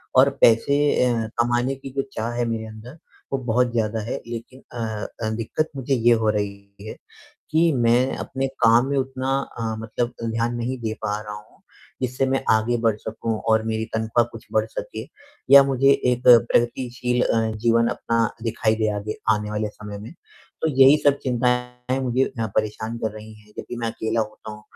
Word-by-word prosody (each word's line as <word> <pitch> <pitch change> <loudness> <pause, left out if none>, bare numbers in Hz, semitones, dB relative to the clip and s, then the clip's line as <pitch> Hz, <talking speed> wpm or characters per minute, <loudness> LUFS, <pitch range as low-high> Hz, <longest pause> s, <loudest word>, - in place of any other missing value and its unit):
और 135 +2 +7
पैसे 115 +5 +5 0.3
अ, 115 -3 0
कमाने 120 +3 +1
की 135 0 -9
जो 135 - +3
चाह 115 +2 -3
है 120 0 -1
मेरे 115 -1 -3
अंदर, 110 +7 -11 0.4
वो 135 - +2
बहुत 125 0 +1
ज़्यादा 110 -1 -1
है। 115 - -4
लेकिन 120 +3 -8
अ 120 - -6 0.4
अ, 110 - 0
दिक्कत 115 +8 -2
मुझे 135 0 -2
ये 120 0 +4
हो 110 - +2
रही 100 -1 -4
है - - -6 0.6
कि 160 +1 +3
मैं 120 +2 +2
अपने 135 0 -3 0.2
काम 115 +3 +5
में 140 - 0
उतना 130 0 -3 0.3
अ, 115 -1 -2
मतलब 115 +2 -3
ध्यान 115 +1 -1
नहीं 125 +2 -3
दे 110 -2 -2
पा 105 +1 -2
रहा 105 -1 -7
हूँ, 105 0 -14 0.4
जिससे 130 +1 0
मैं 135 0 0
आगे 110 +2 +2
बढ़ 110 -2 +2
सकूँ 110 +1 -4
और 110 0 +4
मेरी 110 0 -1
तनख्वाह 110 +1 +2
कुछ - - -11
बढ़ - - +2
सके, - - -6 0.5
या 140 - +11
मुझे 135 0 +3 0.2
एक 125 - -3
प्रगतिशील 125 +1 +3
अ, 115 - +2 0.2
जीवन 115 +1 +2
अपना 115 -1 0 0.2
दिखाई 110 -1 +1
दे 110 -1 +1
आगे 105 +1 -5 0.2
आने 105 0 -4
वाले 105 0 -1
समय 105 -1 -9
में। 110 +8 -9 0.5
तो 160 - +2
यही 135 +2 +7
सब 140 0 +4
चिंताएँ 125 0 -1
मुझे 130 0 +1 0.2
हाँ 110 - 0
परेशान 110 +2 -1
कर 110 -2 -2
रही 110 0 -10
हैं। 105 0 -22
जब - - -3
भी 120 - -4
मैं 115 -1 -2
अकेला 110 +1 -1
होता 110 0 -6
हूँ, 105 0 -11
115 Hz, 190 wpm, -23 LUFS, 110-125 Hz, 0.6 s, या